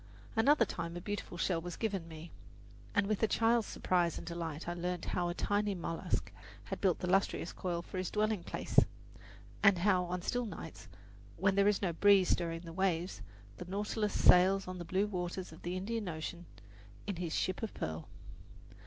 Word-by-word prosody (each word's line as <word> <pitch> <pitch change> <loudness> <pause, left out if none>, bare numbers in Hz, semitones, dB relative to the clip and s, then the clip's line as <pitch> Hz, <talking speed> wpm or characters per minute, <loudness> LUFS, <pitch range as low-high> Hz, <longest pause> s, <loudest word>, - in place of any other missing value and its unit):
Another 280 +7 +5
time 170 +1 -5
a - - -3
beautiful 205 -1 -5
shell 170 0 0
was 175 0 -6
given 195 -7 -2
me, 160 +1 -9 0.6
and 205 -1 +4
with 210 0 -1
a 220 - +4
child's 230 +1 +3
surprise 175 -2 +1
and - - -7
delight 165 -2 -5
I 175 - -1
learned 175 0 -3
how 175 -1 -1
a 175 - -3
tiny 205 0 0
mollusk 165 -2 -2 0.3
had - - -6
built 185 -4 +3
the 180 - -4
lustrous 190 -2 +1
coil 170 -2 -3
for 185 - -5
his 185 - -2
dwelling 215 -3 0
place, - - +2 0.8
and 200 -3 +6
how 180 0 +3
on 175 0 -3
still 245 +2 -1
nights, 165 - -8 0.5
when 190 +2 +3
there 200 +1 +4
is 205 -1 +2
no 175 -3 +1
breeze 195 +1 +5
stirring 165 -1 0
the 165 -1 -9
waves, 180 -1 0 0.4
the 180 - -6
Nautilus 210 +3 -1
sails 190 +2 +6
on 185 0 -5
the 175 - -5
blue 190 +4 +1
waters 180 -2 -4
of 160 - -13
the 175 +2 -3
Indian 210 +1 -3
Ocean 170 +2 -5 0.6
in 200 -4 -3
his 170 -2 -2
"ship 185 0 -1
of 225 - -3
pearl." 80 0 -4
180 Hz, 190 wpm, -34 LUFS, 170-205 Hz, 0.8 s, and